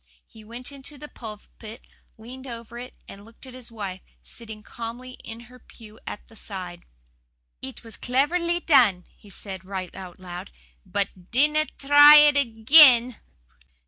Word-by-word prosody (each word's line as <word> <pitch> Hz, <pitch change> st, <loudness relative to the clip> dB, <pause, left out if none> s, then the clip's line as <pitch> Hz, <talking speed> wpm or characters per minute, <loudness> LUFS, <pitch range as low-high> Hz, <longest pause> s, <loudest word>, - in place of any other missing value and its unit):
He 220 Hz, -, -17 dB
went 235 Hz, +5 st, -7 dB
into 280 Hz, +1 st, -8 dB
the 295 Hz, -, -10 dB
pulpit, 220 Hz, -1 st, -12 dB, 0.3 s
leaned 255 Hz, +4 st, -11 dB
over 235 Hz, -1 st, -9 dB
it 250 Hz, +1 st, -10 dB
and 200 Hz, -, -12 dB
looked 225 Hz, +4 st, -15 dB
at 260 Hz, -, -12 dB
his 250 Hz, -2 st, -11 dB
wife, 195 Hz, -4 st, -7 dB, 0.2 s
sitting 220 Hz, -2 st, -10 dB
calmly 235 Hz, +3 st, -8 dB
in 225 Hz, +1 st, -9 dB
her 250 Hz, +1 st, -16 dB
pew 220 Hz, -2 st, -16 dB
at -, -, -8 dB
the 225 Hz, -, -19 dB
side. 185 Hz, -5 st, -8 dB, 0.8 s
"'It 260 Hz, -3 st, -9 dB
was 225 Hz, -2 st, -11 dB
cleverly 340 Hz, +7 st, 0 dB
done,' 240 Hz, -, +3 dB
he 205 Hz, -, -19 dB
said, 190 Hz, -1 st, -6 dB
right 190 Hz, -1 st, -6 dB
out 185 Hz, -2 st, -10 dB
loud, 180 Hz, +1 st, -9 dB, 0.4 s
'BUT 190 Hz, -1 st, -4 dB
DINNA 300 Hz, +4 st, +2 dB
TRY 290 Hz, +1 st, +8 dB
IT 295 Hz, -1 st, +7 dB
AGAIN! 250 Hz, 0 st, +6 dB
230 Hz, 150 wpm, -24 LUFS, 205-265 Hz, 0.8 s, TRY